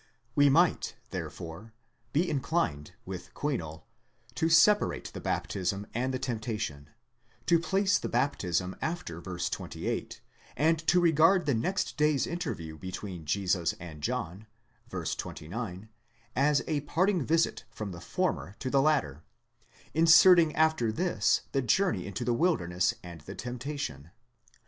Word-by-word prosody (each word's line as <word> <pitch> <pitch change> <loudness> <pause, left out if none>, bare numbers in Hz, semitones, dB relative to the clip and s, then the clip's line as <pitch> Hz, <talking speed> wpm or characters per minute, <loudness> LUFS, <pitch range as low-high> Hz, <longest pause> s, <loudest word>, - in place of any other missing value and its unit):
We 145 0 +5
might 135 - +3 0.2
therefore 90 +7 -7 0.4
be 165 +5 +2
inclined, 135 - -1
with 90 -1 -7
Kuinol, 85 - -3 0.5
to 160 +6 0
separate 170 +6 +4
the - - -7
baptism 100 +1 -2
and 130 +3 -1
the 130 - -1
temptation, 110 - -4 0.6
to 170 -1 +4
place 195 +3 +2
the - - -4
baptism 90 -10 0
after 120 - -4
v. 90 0 -6
28, - - -3 0.4
and 160 +4 +3
to 180 - +5
regard 170 +2 +4
the 140 - +2
next 125 - -1
day's 150 -2 +3
interview 85 - -5
between 95 -2 -6
Jesus 90 0 +1
and 80 -3 -9
John 90 +7 -3 0.4
(ν. - - -4
29) 95 +4 -5 0.5
as 140 +2 +3
a 150 - 0
part 185 +7 +1
ing 180 -7 0
visit 165 +4 +1
from 105 -2 -6
the 85 -1 -9
former 90 +2 -2
to 130 - -4
the 135 - +4
latter: 135 - +1 0.7
inserting 165 0 +7
after 160 -8 +2
this 175 +10 +1
the 135 - +1
journey 125 - +1
into 110 +5 -4
the 120 - +2
wilderness 105 - +1
and 85 -3 -9
the 75 - -9
temptation. 125 - -5
125 Hz, 135 wpm, -29 LUFS, -, 0.7 s, inserting